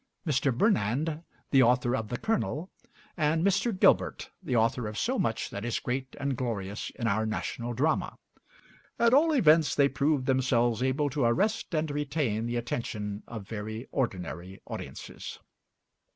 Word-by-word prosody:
Mr. 140 -3 +2
Burnand, 150 - +1 0.3
the 135 - +6
author 125 0 +3
of 110 -4 -3
'The 120 - -3
Colonel,' 195 -6 -1 0.4
and 160 +1 +1
Mr. 200 +1 +1
Gilbert, - - +3
the 125 - -2
author 115 0 +2
of 105 0 -6
so - - 0
much - - -1
that 100 - -5
is 120 0 -1
great 130 +1 -3
and 140 -1 -1
glorious 105 -5 -3
in 115 - -4
our 110 0 +2
national 120 +2 -3
drama; 150 +6 0 0.8
at 235 0 +4
all 315 +4 +5
events 160 - +5
they 140 -1 +5
proved 140 -1 +1
themselves 125 -3 +2
able 135 +2 +1
to 140 -2 +1
arrest 200 - +1
and 155 -1 0
retain 140 -6 -1
the 120 - -2
attention 110 -3 -3
of 110 -4 -7
very 110 +2 -5
ordinary 95 - -3
audiences. - - -7
130 Hz, 150 wpm, -29 LUFS, 115-155 Hz, 0.8 s, the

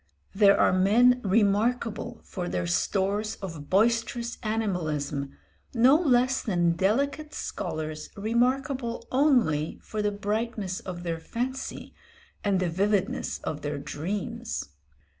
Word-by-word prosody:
There 200 0 +5
are - - +4
men 235 +7 +5
remarkable 225 +4 +1
for 180 -2 -5
their - - -1
stores 200 +4 0
of 165 -7 -8
boisterous 230 +3 +1
animalism, 155 - -2 0.4
no 245 +4 +6
less 265 -5 +3
than 175 -6 +2
delicate 275 - 0
scholars 155 -1 -4
remarkable 245 +3 0
only 245 - +2
for 215 - -3
the 210 - +2
brightness 205 -1 -2
of 175 -2 -7
their 165 -2 -2
fancy 250 +9 -4 0.5
and 200 -3 +2
the 185 - +1
vividness 200 +6 0
of 150 - -4
their 145 0 -3
dreams. 205 - -4
210 Hz, 115 wpm, -27 LUFS, 180-240 Hz, 0.5 s, no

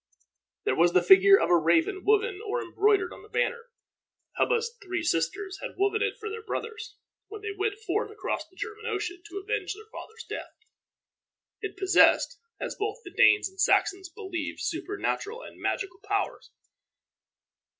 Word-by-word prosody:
There - - +1
was 175 +1 +4
the 180 - +4
figure 390 +1 +8
of - - +1
a - - +7
raven 170 - +2
woven 425 -1 +2
or 450 +3 -2
embroidered 400 -5 +2
on - - -12
the 425 - -16
banner. 475 0 -1 0.7
Hubba's 465 0 +1
three 365 -3 -3
sisters 335 - -1
had - - -7
woven 400 +2 +1
it - - 0
for 435 - -6
their 440 +1 -5
brothers, 450 0 -5 0.3
when 425 0 -9
they 430 - -3
went 405 +1 -1
forth 430 0 -2
across 425 +1 -4
the 370 - -26
German 440 +3 -6
Ocean 360 -5 -3
to 370 - -7
avenge 395 -1 -2
their 435 +2 -13
father's 445 - -9
death. - - -6 1.1
It 420 - -5
possessed, 385 0 +4 0.2
as - - -3
both 420 0 -3
the 365 - -10
Danes 425 - +5
and 385 0 -7
Saxons 380 -1 +2
believed, 360 -5 -5
supernatural 410 +3 -3
and - - -12
magical 380 -1 -2
powers. 405 -1 -2
400 Hz, 160 wpm, -28 LUFS, 375-435 Hz, 1.1 s, figure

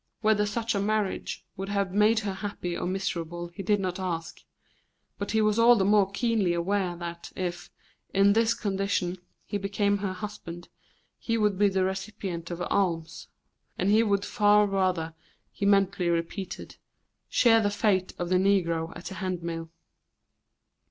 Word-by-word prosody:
Whether 215 -1 +3
such 225 +2 -1
a 200 - 0
marriage 210 -1 -1
would 195 +1 -5
have 200 -2 -1
made 215 +2 +4
her 200 -2 -3
happy 190 -3 -4
or - - -3
miserable 175 -2 -3
he 175 +3 -8
did 205 +2 +2
not 185 -1 -2
ask, 170 -3 -4 0.8
but 200 - -3
he 220 0 +2
was 215 +1 +2
all 240 +1 +7
the 195 -4 +2
more 200 -1 +4
keenly 210 -4 +1
aware 180 +1 0
that 170 0 -7
if, 175 -1 -4 0.4
in 195 +1 +5
this 230 +1 +3
condition, 195 -3 -1 0.3
he 205 - -3
became 200 +1 0
her 195 -2 -2
husband, 185 -4 -8 0.5
he 230 -1 -1
would 210 -2 +2
be 205 +1 +4
the 190 -1 +1
recipient 190 -3 -4
of 175 0 -4
alms, 165 -5 -1 0.5
and 190 +2 +1
he 215 +2 +6
would 200 -2 +1
far 210 -1 +4
rather, 185 -5 0 0.4
he 200 - -2
mentally 195 -3 +3
repeated, 170 +2 -3 0.5
share 225 -2 +5
the 205 - +2
fate 200 -3 +1
of 175 0 -3
the 185 - +4
negro 170 -4 +1
at 170 - -11
the - - -5
handmill. 170 -4 -4
195 Hz, 160 wpm, -27 LUFS, 175-205 Hz, 0.8 s, all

